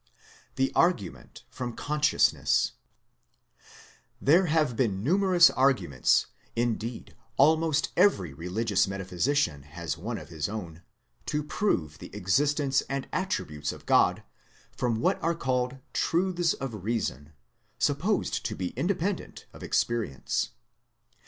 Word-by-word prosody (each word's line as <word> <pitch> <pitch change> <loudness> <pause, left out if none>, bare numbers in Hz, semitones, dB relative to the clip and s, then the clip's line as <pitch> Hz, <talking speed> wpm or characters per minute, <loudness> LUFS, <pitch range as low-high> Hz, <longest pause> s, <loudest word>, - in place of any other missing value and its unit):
THE 135 0 +1
ABGUMENT 100 - 0
FEOM 120 -2 -5
CONSCIOUSNESS 150 +4 +2 1.6
have 155 -4 +4
been 105 -6 0
numerous 180 - +5
arguments, 130 - +2 0.3
indeed 115 0 -2 0.2
almost 155 +1 +3
every 170 - +3
religious 95 +7 0
metaphysician 95 - -1
has 80 +4 -6
one - - -4
of - - -10
his 80 -1 -3
own, 90 -6 -6 0.5
to 150 0 -1
prove 85 - -1
the - - -9
existence 140 - +2
and 135 0 -3
attributes 75 - -2
of - - -12
God - - +3 0.5
from 115 -3 -1
what - - +1
are 165 +1 +1
called 125 -3 -1 0.2
truths 175 -1 +1
of 115 -8 -6
reason, 80 - -3 0.4
supposed - - 0
to - - -5
be 90 -1 -3
independent 180 - -2
of - - -13
experience. 115 - -1
125 Hz, 110 wpm, -28 LUFS, 90-155 Hz, 1.6 s, numerous